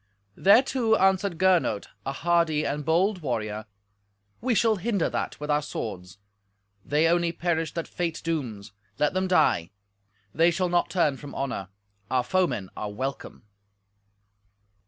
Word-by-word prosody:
Thereto 225 +2 +4
answered 190 -2 +2
Gernot, 180 - +2 0.2
a - - 0
hardy 165 0 +1
and 145 +1 -2
bold 180 +5 +1
warrior, 110 -5 -3 0.7
"We 245 0 +1
shall 220 0 +3
hinder 200 -2 0
that - - -3
with 150 0 -3
our 150 0 +2
swords. 95 -10 -6 0.7
They 150 +2 +2
only 170 0 +2
perish 165 -2 -1
that 165 - -3
fate 170 -2 -3
dooms. 125 -12 -3 0.3
Let 150 - +1
them 185 0 0
die. 155 - +3 0.6
They 165 +2 +4
shall 180 +1 0
not 175 0 +1
turn 155 -7 +1
from 145 -1 -10
honour. 130 -8 -3 0.4
Our 125 -1 +1
foemen 175 - 0
are 105 - -4
welcome." 130 +4 -5
165 Hz, 135 wpm, -26 LUFS, 135-185 Hz, 0.7 s, Thereto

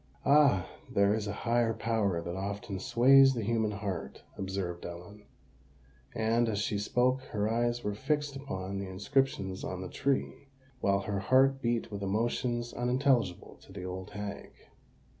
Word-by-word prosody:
"Ah! 140 -11 +5 0.2
there 100 +1 +3
is 105 -1 -2
a - - -2
higher 115 -1 +2
power 100 -7 0
that 85 +1 -4
often 100 0 -4
sways 130 +3 +6
the 115 - -2
human 110 0 +1
heart," 100 -3 -5
observed 95 -2 -4
Ellen; 90 +5 -9 0.9
and, 115 +1 +2
as 105 - -1
she 105 0 -1
spoke, 125 +5 +1
her 105 -2 -1
eyes 120 +1 0
were 105 - -1
fixed 145 +6 -1
upon 100 -8 -5
the 100 - -4
inscriptions 100 0 -1
on 95 0 -4
the 90 - -6
tree, 140 0 -1 0.3
while 100 -2 +2
her 100 0 -2
heart 135 +6 +3
beat 120 -2 -1
with 100 -1 -5
emotions 120 +4 -1
unintelligible 125 -6 0
to - - -16
the 95 -1 -7
old 95 0 -6
hag. 105 -1 -6
105 Hz, 155 wpm, -30 LUFS, 100-120 Hz, 0.9 s, sways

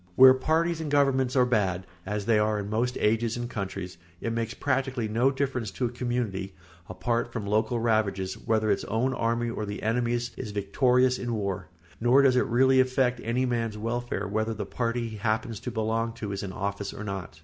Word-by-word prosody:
Where 130 0 +9
parties 160 +5 +1
and 155 - -3
governments 135 -3 +2
are 125 -2 +5
bad, 95 -7 0 0.2
as 105 0 -2
they 110 -1 +4
are 105 0 +1
in 100 0 -4
most 120 +3 0
ages 115 +2 +1
and 120 0 -3
countries, 95 -5 -5 0.2
it 115 - -2
makes 115 0 -2
practically 130 -4 -1
no 115 +5 +2
difference 130 -5 -2
to 125 - -1
a - - 0
community, 120 -6 -3 0.3
apart 115 +6 -1
from 115 -4 -4
local 110 +3 +1
ravages, 105 -5 +1
whether 110 -2 0
its 100 - 0
own 125 +4 0
army 115 -1 0
or 110 - -4
the 105 0 -5
enemy's 120 +1 0
is - - -5
victorious 125 +5 +2
in 120 -2 -2
war, 100 -3 -3 0.3
nor 125 +4 +5
does 130 -2 +5
it 125 - +2
really 130 +2 +4
affect 130 -1 +2
any 120 +4 0
man's 115 -3 -1
welfare 115 -2 -2
whether 110 +2 -1
the - - -4
party 115 -1 -2
he 110 -1 -7
happens 110 +1 -1
to 125 - -5
belong 115 0 -1
to 105 -3 -5
is 100 - -3
in 100 - -5
office 100 0 -4
or 110 - -6
not. 95 -5 -6
115 Hz, 200 wpm, -27 LUFS, 105-125 Hz, 0.3 s, Where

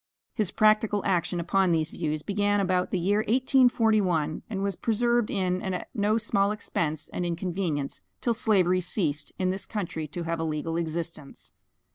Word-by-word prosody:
His 215 -6 +1
practical 215 -1 +3
action 180 -2 0
upon 190 +2 +2
these 160 -1 +1
views 155 -2 -3
began 205 0 +1
about 185 -2 +1
the - - -1
year 195 +4 +1
1841, 220 - +2
and 195 -3 -3
was 200 -2 -1
persevered 235 +1 +1
in, 185 -2 0
at 185 -1 -4
no 215 -1 +1
small 205 -3 +1
expense 160 -7 -2
and 180 - -3
inconvenience, 170 -4 -2 0.2
till 235 - +1
slavery 185 -5 +2
ceased 155 -5 0
in 185 -1 +1
this 190 +1 -5
country 170 -7 -4
to 170 +4 -5
have 165 0 -2
a - - -1
legal 160 +1 -2
existence. 165 -3 -5
185 Hz, 160 wpm, -27 LUFS, 165-210 Hz, 0.2 s, practical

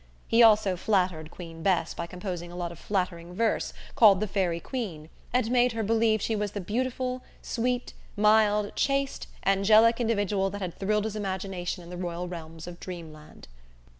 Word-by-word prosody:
He 230 - +4
also 215 -4 +6
flattered 180 -6 0
Queen 165 -2 -10
Bess 170 -2 +1
by 170 - -5
composing 180 -1 -6
a - - -9
lot 175 -1 -3
of 170 - -11
flattering 180 -3 -2
verse, 225 +2 0 0.2
called 205 -5 +7
the 215 - 0
"Faerie 185 -4 0
Queen," 175 - -5 0.2
and 245 -2 +1
made 245 -1 +3
her 225 -1 -2
believe 220 0 +2
she 225 - 0
was 210 -1 -2
the 205 - -3
beautiful, 255 +5 -2 0.2
sweet, 245 +1 -1 0.2
mild, 210 -1 +3
chaste, 275 0 0 0.2
angelic 215 +4 +5
individual 205 -4 +1
that 200 +1 -6
had 180 -3 -3
thrilled 210 +1 0
his 220 -1 -3
imagination 190 -3 -3
in 170 - -11
the 180 - -6
royal 175 0 -4
realms 165 -2 -8
of 175 0 -9
dreamland. 160 -4 -10
195 Hz, 170 wpm, -27 LUFS, 175-220 Hz, 0.2 s, called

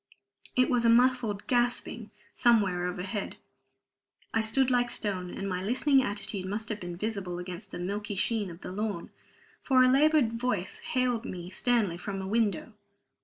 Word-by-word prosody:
It 255 0 +4
was 245 -2 +2
a 230 - +5
muffled 235 -4 +3
gasping 240 -2 0 0.2
somewhere 200 -7 +3
overhead. 185 +3 -4 1.0
I 225 - +2
stood 255 +4 +2
like 245 -1 +2
stone; 190 -6 0
and 195 - -5
my 180 -1 -2
listening 260 +7 +3
attitude 200 -4 -3
must 210 +2 -3
have 215 -2 -3
been 175 -2 -6
visible 195 -3 -3
against 180 +2 -7
the - - -7
milky 205 +3 -3
sheen 210 0 0
of 170 +1 -11
the - - -7
lawn, 205 -3 -3 0.5
for 255 -2 +4
a - - +6
labored 280 -2 +4
voice 230 -6 -2
hailed 250 -3 0
me 180 -5 -7
sternly 215 -5 +1
from 195 +1 -4
a 190 - -4
window. 220 +1 0
215 Hz, 165 wpm, -29 LUFS, 190-245 Hz, 1.0 s, a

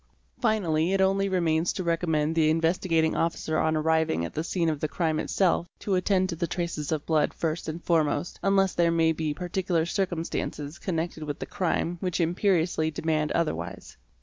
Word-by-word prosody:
Finally 185 -7 +1
it 195 - +2
only 195 +1 +2
remains 170 -2 +1
to 185 - -4
recommend 165 -2 +1
the 160 -1 +3
Investigating 165 0 +1
Officer 160 -1 0
on 160 0 +2
arriving 160 - +1
at - - -7
the 155 - -2
scene 170 -1 -1
of 155 -2 0
the 155 - -1
crime 155 +1 -1
itself 175 -1 +1
to 200 - -2
attend 185 0 +2
to 175 - -4
the 170 +1 -2
traces 170 -4 -3
of 155 -2 -1
blood 155 -2 +1
first 160 0 -2
and 165 +2 -6
foremost, 165 0 0
un 195 0 +2
less 195 -1 +3
there 170 -1 +3
may 165 -1 +3
be 155 -1 -2
particular 180 0 -1
circumstances 170 -4 -3
connected 165 -3 -3
with 150 -2 -4
the - - -5
crime 175 -1 -1
which 180 -1 -2
imperiously 170 -2 +1
demand 155 0 -1
otherwise. 165 -2 -3
165 Hz, 180 wpm, -27 LUFS, 155-180 Hz, -, the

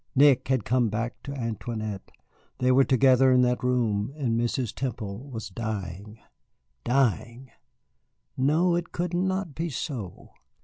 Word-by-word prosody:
Nick 135 -2 +5
had 130 -6 +1
come 120 -1 +2
back 115 +3 -3
to 140 - -7
Antoinette. 110 -5 -4 0.5
They 125 0 +2
were 135 +2 +6
together 130 0 +4
in 125 0 +5
that 125 0 +1
room, 115 -3 +1
and 125 -6 0
Mrs. 120 0 -1
Temple 120 -1 -5
was 110 -5 -6
dying 105 -1 -5 0.7
dying. 125 0 0 0.8
No, 155 +7 +2
it 175 0 -3
could 175 0 -3
not 185 -2 -1
be 165 +4 -3
so. 120 - -6
125 Hz, 135 wpm, -26 LUFS, 110-135 Hz, 0.8 s, were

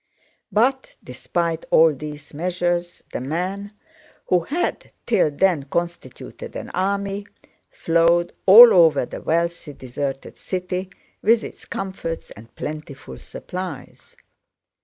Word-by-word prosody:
But 260 +5 +1
despite 165 +6 -3
all 160 -1 +6
these 150 +1 -9
measures 175 +1 -2
the - - -3
men, 185 +8 -3 0.5
who 180 - +3
had 295 - -3
till 215 -9 +3
then 155 -1 +1
constituted 170 -3 -5
an - - -6
army, 200 +2 -2 0.4
flowed 170 +1 +2
all 230 +5 +11
over 160 -7 +5
the - - -8
wealthy, 170 -2 -1
deserted 135 +1 -5
city 185 0 -4 0.3
with 230 0 +3
its - - -9
comforts 190 -4 -5
and 115 +3 -14
plentiful 150 -2 -7
supplies. 180 -6 -8
175 Hz, 110 wpm, -22 LUFS, 150-190 Hz, 0.5 s, all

